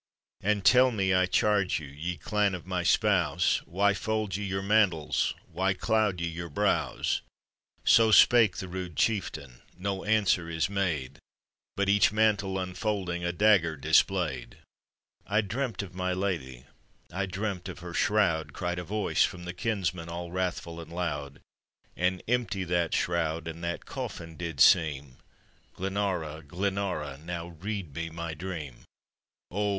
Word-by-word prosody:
"And 105 Hz, -1 st, 0 dB
tell 125 Hz, +6 st, +7 dB
me, 95 Hz, -5 st, +1 dB
I 95 Hz, 0 st, +3 dB
charge 100 Hz, 0 st, +2 dB
you! 80 Hz, -, -8 dB
ye 80 Hz, +6 st, -5 dB
clan 100 Hz, +5 st, 0 dB
of 90 Hz, -, -9 dB
my 90 Hz, -1 st, -1 dB
spouse. 90 Hz, -4 st, +2 dB
Why 100 Hz, +3 st, +2 dB
fold 110 Hz, -1 st, -2 dB
ye 100 Hz, -, -3 dB
your 95 Hz, -1 st, -2 dB
mantles, 100 Hz, -7 st, +2 dB
why 95 Hz, +1 st, -1 dB
cloud 110 Hz, -2 st, +1 dB
ye 85 Hz, -, -1 dB
your 85 Hz, +1 st, -5 dB
brows?" 70 Hz, -, 0 dB, 0.6 s
So 115 Hz, -1 st, +6 dB
spake 115 Hz, 0 st, +6 dB
the 95 Hz, -, -5 dB
rude 90 Hz, -2 st, -6 dB
chieftain:— 75 Hz, -, -1 dB, 0.2 s
no 95 Hz, +1 st, -3 dB
answer 100 Hz, -5 st, +2 dB
is 80 Hz, +3 st, -1 dB
made, 80 Hz, -9 st, -2 dB, 0.6 s
But 100 Hz, 0 st, 0 dB
each 100 Hz, -1 st, +4 dB
mantle 105 Hz, -3 st, +2 dB
unfolding, 90 Hz, -1 st, -2 dB
a 85 Hz, -, 0 dB
dagger 90 Hz, -4 st, +3 dB
display'd. 75 Hz, -3 st, +1 dB, 0.4 s
" -, -, -66 dB, 0.3 s
I 105 Hz, +2 st, +2 dB
dreamt 110 Hz, 0 st, -3 dB
of 95 Hz, -, -10 dB
my 90 Hz, 0 st, -1 dB
lady, 80 Hz, -10 st, -3 dB, 0.5 s
I 95 Hz, +1 st, -2 dB
dreamt 95 Hz, -1 st, -4 dB
of 90 Hz, -, -7 dB
her 90 Hz, 0 st, -7 dB
ihroud," 95 Hz, -8 st, +1 dB
Cried 90 Hz, 0 st, -3 dB
a -, -, -4 dB
voiue 105 Hz, +4 st, +1 dB
from 90 Hz, -, -2 dB
the 90 Hz, -, -5 dB
kinsmen, 90 Hz, -4 st, -2 dB
all 85 Hz, 0 st, -5 dB
wrathful 90 Hz, -2 st, -3 dB
and 80 Hz, 0 st, -12 dB
loud; 75 Hz, -5 st, -4 dB, 0.5 s
"And 90 Hz, +1 st, 0 dB
empty 115 Hz, -5 st, 0 dB
that 85 Hz, -1 st, 0 dB
shroud, 85 Hz, -2 st, -1 dB
and 80 Hz, +1 st, -7 dB
that 85 Hz, 0 st, -3 dB
coffin 80 Hz, -1 st, -6 dB
did 85 Hz, -2 st, -5 dB
teem: 70 Hz, -4 st, +4 dB, 0.6 s
Glenara! 95 Hz, -5 st, -2 dB
Glenara! 85 Hz, -4 st, -3 dB
now 85 Hz, 0 st, -5 dB
read 90 Hz, -1 st, -5 dB
me 85 Hz, +2 st, -4 dB
my 85 Hz, 0 st, -5 dB
dream 80 Hz, -6 st, -6 dB, 0.7 s
I" -, -, -11 dB
O! 105 Hz, 0 st, +1 dB
90 Hz, 155 wpm, -28 LUFS, 85-100 Hz, 0.7 s, tell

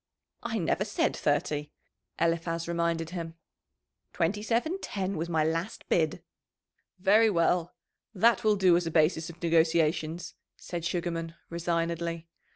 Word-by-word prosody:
"I 225 Hz, -, -2 dB
never 180 Hz, +1 st, 0 dB
said 205 Hz, 0 st, 0 dB
thirty," 145 Hz, 0 st, 0 dB, 0.5 s
Eliphaz 165 Hz, 0 st, 0 dB
reminded 170 Hz, -1 st, -1 dB
him. 165 Hz, -2 st, -5 dB, 0.8 s
"Twenty 185 Hz, +4 st, 0 dB
seven 245 Hz, -, 0 dB
ten 195 Hz, -1 st, -3 dB
was 165 Hz, +1 st, -3 dB
my 160 Hz, -2 st, +2 dB
last 165 Hz, +5 st, -2 dB
bid." 160 Hz, -3 st, +1 dB, 0.7 s
"Very 210 Hz, +4 st, +5 dB
well; 175 Hz, -1 st, +1 dB, 0.4 s
that 230 Hz, +3 st, +3 dB
will 215 Hz, -1 st, +4 dB
do 185 Hz, -3 st, +5 dB
as 175 Hz, -1 st, +1 dB
a -, -, 0 dB
basis 160 Hz, +1 st, +2 dB
of 170 Hz, 0 st, -11 dB
negotiations," 165 Hz, 0 st, +1 dB, 0.2 s
said 170 Hz, -2 st, -5 dB
Sugarman 170 Hz, -2 st, -2 dB, 0.2 s
resignedly. 170 Hz, 0 st, -2 dB
170 Hz, 130 wpm, -29 LUFS, 165-185 Hz, 0.8 s, Very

